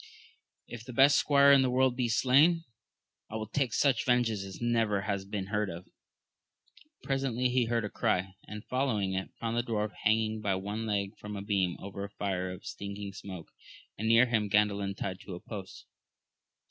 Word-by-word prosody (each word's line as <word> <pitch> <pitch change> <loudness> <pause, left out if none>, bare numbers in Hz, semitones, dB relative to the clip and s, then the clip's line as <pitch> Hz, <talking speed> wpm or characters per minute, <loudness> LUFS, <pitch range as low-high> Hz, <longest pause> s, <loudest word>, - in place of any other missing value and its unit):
If 120 -2 -9
the 125 +1 -9
best 135 +4 +6
squire 140 -1 +5
in 140 -1 +7
the 130 - +2
world 130 0 +2
be 125 -2 0
slain, 140 +8 +4 0.7
I 110 - -7
will 110 -1 -3
take 125 +3 -1
such 135 +1 +2
vengeance 120 -5 +1
as 95 -1 -9
never 115 -4 +1
has 100 -1 -2
been 100 -1 -4
heard 105 -1 +1
of. 85 +1 -8 1.2
Presently 130 -2 0
he 125 -1 +2
heard 115 -1 0
a - - -4
cry, 95 +1 0
and 105 +1 -8
following 115 -7 0
it 95 0 -3
found 115 0 -2
the - - +3
dwarf 110 -3 -2
hang 110 +1 +4
ing 110 0 -3
by 100 -3 0
one 105 +4 -4
leg 100 0 -1
from 105 0 -7
a 100 - -5
beam 95 -4 0
over 100 0 -6
a 100 - -5
fire 95 -2 -3
of 90 +1 -10
stinking 100 0 -6
smoke, 95 -4 -9 0.5
and 110 - -3
near 115 +2 +6
him 110 -4 0
Gandalin 100 -1 +1
tied 95 -1 -4
to 95 - -8
a - - -8
post. 95 -3 -9
105 Hz, 190 wpm, -30 LUFS, 100-120 Hz, 1.2 s, in